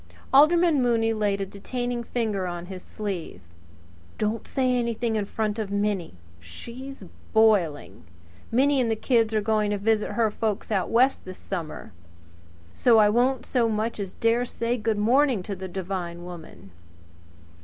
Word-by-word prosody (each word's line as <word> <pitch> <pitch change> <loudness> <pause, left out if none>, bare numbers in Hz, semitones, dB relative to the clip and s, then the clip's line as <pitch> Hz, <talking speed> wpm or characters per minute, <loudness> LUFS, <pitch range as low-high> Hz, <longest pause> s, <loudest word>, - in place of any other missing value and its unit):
Alderman 310 +1 +5
Mooney 230 -2 +2
laid 205 -2 0
a - - -1
detaining 245 +5 -4
finger 215 -6 -2
on 175 0 -5
his 185 0 -8
sleeve. 200 -6 -5 0.8
"Don't 215 +1 -2
say 255 -2 +1
anything 235 -1 -1
in 210 -2 0
front 215 +1 -2
of 210 -3 -3
Minnie! 200 - -1 0.2
She's 235 - -9 0.3
boiling! 175 - +2 0.5
Minnie 270 +3 +3
and 235 - 0
the 225 - +1
kids 225 -1 +2
are 215 - +2
going 215 0 +1
to 205 - 0
visit 215 +1 0
her 225 -2 +1
folks 215 0 -3
out 195 -3 0
West 255 +4 +3
this 185 0 -9
summer; 165 - -6 0.8
so 235 - +4
I 210 -1 +6
wouldn't 245 +4 +1
so 235 -3 +1
much 220 +1 -2
as 195 -2 -5
dare 230 +2 +2
to 245 - -7
say 235 +1 -1
'Good 220 -2 -1
morning!' 245 0 +3
to 200 +1 -5
the 190 0 -6
Devine 175 -2 -5
woman. 160 - -11
215 Hz, 160 wpm, -25 LUFS, 195-235 Hz, 0.8 s, I